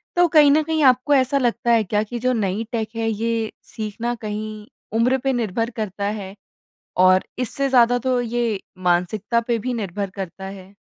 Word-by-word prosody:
तो 350 0 +5
कहीं 305 -3 +6
न 305 +2 +4
कहीं 315 0 0
आपको 255 +2 +4
ऐसा 265 0 +3
लगता 240 -2 +1
है 230 -2 +4
क्या 210 +1 0
कि 240 +3 -6
जो 255 +2 +1
नई 205 -1 -1
टेक 225 -2 -2
है, 225 0 -1
ये 225 0 -1
सीखना 225 +2 -4
कहीं 215 0 -5 0.3
उम्र 250 +3 +3
पे 270 -1 +1
निर्भर 230 -1 -1
करता 205 -2 -3
है 195 0 -8 0.6
और 185 0 +6 0.2
इससे 275 +2 -1
ज़्यादा 245 -2 +5
तो 255 0 0
ये 235 -3 -1 0.2
मानसिकता 180 +6 +1
पे 235 -1 +1
भी 250 +4 -3
निर्भर 200 -3 -3
करता 190 -1 -6
है? 195 0 -10
230 Hz, 180 wpm, -22 LUFS, 205-250 Hz, 0.6 s, कहीं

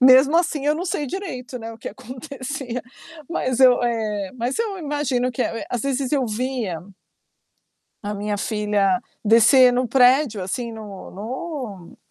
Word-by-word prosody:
Mesmo 265 +4 +7
assim 320 -5 +1
eu 300 - +4
não 340 +4 -3
sei 295 -5 -2
direito, 260 -8 -5
né, 225 -1 -6
o 225 - -13
que - - -6
acontecia, 255 +1 -6 0.5
mas 255 -6 -1
eu 255 -1 +7
É, 215 -5 -1
mas 250 +1 -2
eu 440 -4 -1
imagino 285 -5 -1
que, 255 - -6
eh 230 - -1
eh, - - -7
às 245 - -2
vezes 275 -1 -1
eu 270 -4 +1
via 225 -6 -2 1.2
a 205 - -2
minha 205 +1 -2
filha 205 -3 +1 0.2
descer 235 +4 +7
no 250 +1 +1
prédio, 250 -4 +4
assim, 235 +5 -3
no 210 -3 -9
no 230 - -6
250 Hz, 160 wpm, -22 LUFS, 220-275 Hz, 1.2 s, Mesmo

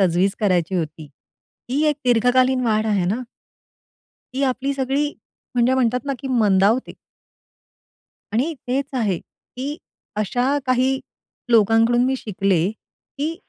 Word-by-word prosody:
तजवीज 190 +2 +2
करायची 185 -3 +1
होती. 155 -3 -3 0.6
ही 280 +3 +1
एक 295 - +1
दीर्घकालीन 250 +2 +3
वाढ 215 0 +1
आहे 200 -4 +1
ना. 210 +8 0 1.1
ती 275 - -1
आपली 270 +2 -2
सगळी 275 +2 0 0.4
म्हणजे 245 +2 +3
म्हणतात 250 -1 +1
ना 275 - 0
की 270 - -6
मंदावते. 215 0 +3 1.4
आणि 275 +9 0
तेच 270 +2 +1
आहे, 210 -9 0
की 280 +4 -8 0.4
अशा 245 +7 +1
काही 255 +1 +2 0.5
लोकांकडून 230 +2 +4
मी 265 +1 +1
शिकले, 195 -5 0
की 290 +7 -7
245 Hz, 120 wpm, -21 LUFS, 205-265 Hz, 1.4 s, लोकांकडून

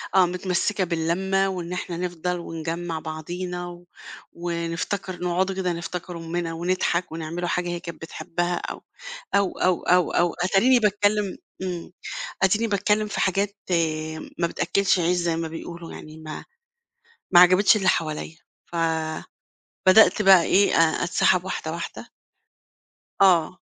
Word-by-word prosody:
آه، 190 -1 +7
متمسكة 185 +3 -1
باللمة، 185 +3 0
وإن 180 -2 -4
إحنا 180 -1 -4
نفضل، 180 0 -3
ونجمّع 165 0 -4
بعضينا، 175 +3 -5
و 175 0 -11 0.5
ونفتكر، 170 +2 -3
نقعدوا 185 +2 0
كده 185 -2 -1
نفتكر 170 +1 -5
أٌمنا، 165 0 -3
ونضحك، 175 0 -1
ونعمل 165 +2 -4
حاجة 180 0 -1
هي 175 0 -3
كانت 170 -1 -9
بتحبها، 175 +2 -3
أو - - -6 0.5
أو 200 -2 +2
أو 180 -1 +2
أو 180 -1 +3
أو 175 -1 +2
أتاريني 195 +8 +3
باتكلم 205 -2 +1 0.3
إمم، 180 -2 -5 0.5
أديني 210 +4 +3
باتكلم 210 +1 +1
في 210 - -4
حاجات 200 +2 0 0.8
ما 170 - +2
بتأكّلش 195 +2 +1
عيش، 175 +1 +2
زي 170 -1 0
ما 165 0 -2
بيقولوا 170 +1 -8
يعني، 155 0 -10
ما 155 -1 -8 0.9
ما 175 - +8
عجبتش 185 +4 +6
اللي 195 -3 0
حواليا، 155 0 -2 0.3
ف - - -11 1.1
بدأت 215 +3 +7
بقى 190 -3 +7
إيه، 200 +4 +3
أ 165 0 +3
أتسحّب 180 0 +2
واحدة 160 -4 -4
واحدة. 170 +1 -7 1.1
آه. 185 -1 +4
175 Hz, 135 wpm, -24 LUFS, 170-190 Hz, 1.1 s, ما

